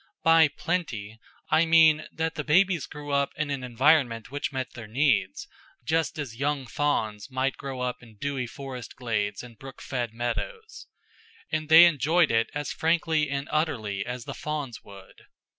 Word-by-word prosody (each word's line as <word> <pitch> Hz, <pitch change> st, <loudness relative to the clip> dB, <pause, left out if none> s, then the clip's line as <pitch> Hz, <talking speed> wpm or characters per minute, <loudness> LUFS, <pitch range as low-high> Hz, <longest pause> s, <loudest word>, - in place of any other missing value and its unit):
By 165 Hz, -1 st, +6 dB
"plenty" 115 Hz, -, -4 dB, 0.3 s
I 165 Hz, +1 st, +4 dB
mean 160 Hz, -1 st, +5 dB
that 160 Hz, 0 st, -2 dB
the 155 Hz, -2 st, -4 dB
babies 175 Hz, +1 st, +3 dB
grew 145 Hz, -1 st, -8 dB
up 140 Hz, 0 st, +1 dB
in 150 Hz, -1 st, -2 dB
an 135 Hz, -2 st, -3 dB
environment 125 Hz, -1 st, +2 dB
which 145 Hz, +1 st, -3 dB
met 130 Hz, -1 st, -4 dB
their 115 Hz, -3 st, -9 dB
needs, 130 Hz, +1 st, +1 dB, 0.4 s
just 160 Hz, +1 st, 0 dB
as 135 Hz, -7 st, -5 dB
young 140 Hz, -1 st, -1 dB
fawns 110 Hz, -6 st, -1 dB
might 130 Hz, 0 st, -1 dB
grow 135 Hz, -2 st, -6 dB
up 125 Hz, 0 st, -3 dB
in 115 Hz, -3 st, -16 dB
dewy 135 Hz, 0 st, -3 dB
forest 130 Hz, -2 st, -8 dB
glades 105 Hz, -4 st, -2 dB
and 115 Hz, -3 st, -13 dB
brook 135 Hz, -1 st, -11 dB
fed 120 Hz, -4 st, -3 dB
meadows. 440 Hz, -, -5 dB, 0.6 s
And 155 Hz, -1 st, -2 dB
they 165 Hz, +2 st, +10 dB
enjoyed 165 Hz, +1 st, +3 dB
it 115 Hz, 0 st, +2 dB
as 145 Hz, -1 st, -3 dB
frankly 160 Hz, -2 st, +1 dB
and 140 Hz, +1 st, -3 dB
utterly 110 Hz, -11 st, -1 dB
as 125 Hz, +1 st, -6 dB
the -, -, -5 dB
fawns 145 Hz, -6 st, -5 dB
would. 100 Hz, -1 st, -14 dB
140 Hz, 165 wpm, -26 LUFS, 120-155 Hz, 0.6 s, they